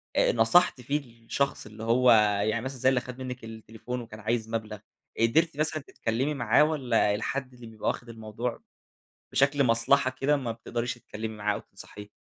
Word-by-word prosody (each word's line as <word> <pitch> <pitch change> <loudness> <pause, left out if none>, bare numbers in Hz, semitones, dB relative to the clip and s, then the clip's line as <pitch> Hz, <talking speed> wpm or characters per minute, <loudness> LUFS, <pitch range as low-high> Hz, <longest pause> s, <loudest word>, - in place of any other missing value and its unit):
آآ، - - +4
نصَحتِ 120 +5 +4
فيه 140 +5 -1 0.3
الشخص 140 +4 -1
اللي 105 +1 -10
هو، 120 +2 +4 0.3
يعني 110 +2 0
مثلًا 130 +2 -5
زي 130 - +4
اللي 130 -2 +2
خَد 125 0 -9
منِك 125 -1 -6
التليفون 115 +2 -7
وكان 110 -2 -10
عايز 110 +1 -1
مبلَغ، 110 -2 -4 0.4
قدِرتي 155 +8 +2
مثلًا 155 -1 0
تتكلّمي 125 +7 -1
معاه 120 +1 +4
واَّلا 125 -9 +2
الحد 130 +4 -3
اللي 120 -2 -12
بيبقى 110 -1 -6
واخد 120 - -2
الموضوع 115 +1 -5 0.7
بشكل 140 +1 +3
مصلحة 125 +3 +3
كده 140 +3 +1
ما 125 -4 -3
بتقدريش 115 +1 -3
تتكلّمي 110 -2 -7
معاه 105 0 0
أو - - -4
تنصَحيه؟ 105 +1 -12
120 Hz, 170 wpm, -28 LUFS, 110-130 Hz, 0.7 s, آآ